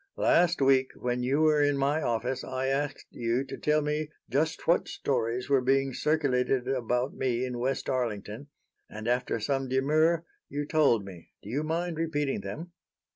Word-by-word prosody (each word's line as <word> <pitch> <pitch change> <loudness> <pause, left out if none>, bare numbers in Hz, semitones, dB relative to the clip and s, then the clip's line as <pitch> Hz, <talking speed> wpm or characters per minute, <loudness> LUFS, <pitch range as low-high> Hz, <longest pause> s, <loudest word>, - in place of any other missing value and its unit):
Last 170 -2 +3
week 135 -1 +4
when 125 0 -2
you 135 +5 +1
were 155 -1 +4
in 145 -1 +2
my 140 +3 +1
office 120 0 -1
I 130 0 -3
asked 140 +2 -1
you 120 +3 -1
to 135 - -7
tell 150 0 +1
me 150 +1 -1 0.2
just 155 +5 0
what 170 - +3
stories 125 -2 -1
were 140 -2 +3
being 135 +1 +2
circulated 130 -4 +1
about 125 0 0
me 125 -1 -1
in 125 -1 -4
West 130 +3 -1
Arlington, 115 0 -3 0.4
and 110 +1 -7
after 125 -1 0
some 135 +4 -1
demur 155 +6 +2 0.2
you 145 +1 -3
told 140 -9 +3
me. 90 -4 -11
Do 105 - -8
you 140 +4 0
mind 165 +2 -2
repeating 150 -4 -1
them?" 170 +3 -7
135 Hz, 170 wpm, -28 LUFS, 125-150 Hz, 0.4 s, week